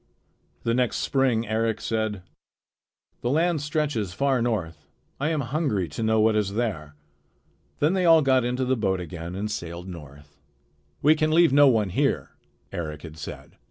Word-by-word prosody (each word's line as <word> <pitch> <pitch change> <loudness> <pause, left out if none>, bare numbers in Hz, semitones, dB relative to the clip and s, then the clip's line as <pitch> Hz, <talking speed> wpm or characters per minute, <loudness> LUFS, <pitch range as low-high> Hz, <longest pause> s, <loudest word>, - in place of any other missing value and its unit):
The 115 - +1
next 125 -1 +1
spring 125 -5 +1
Eric 110 +1 0
said: 110 -4 -2 1.0
"The 120 - -1
land 160 +2 +1
stretches 145 - -2
far 135 +1 +1
north. 90 -10 -3 0.3
I 145 +3 0
am 155 -3 0
hungry 130 - -1
to 80 - -6
know 110 0 +2
what 110 0 +3
is 100 -2 0
there." 85 -11 -3 0.8
Then 150 +5 +2
they 185 -2 +1
all 165 -2 +6
got 130 -2 +3
into 125 +2 -1
the 130 +1 +1
boat 95 -5 0
again 85 0 -7
and 105 +2 -3
sailed 85 -3 -6
north. 75 -4 -12 0.6
"We 150 +2 +7
can 155 0 0
leave 165 -2 +4
no 145 0 +7
one 110 -6 +3
here," - - 0 0.4
Eric 75 -3 -5
had 80 -2 -9
said. 70 - -9
110 Hz, 165 wpm, -25 LUFS, 90-140 Hz, 1.0 s, We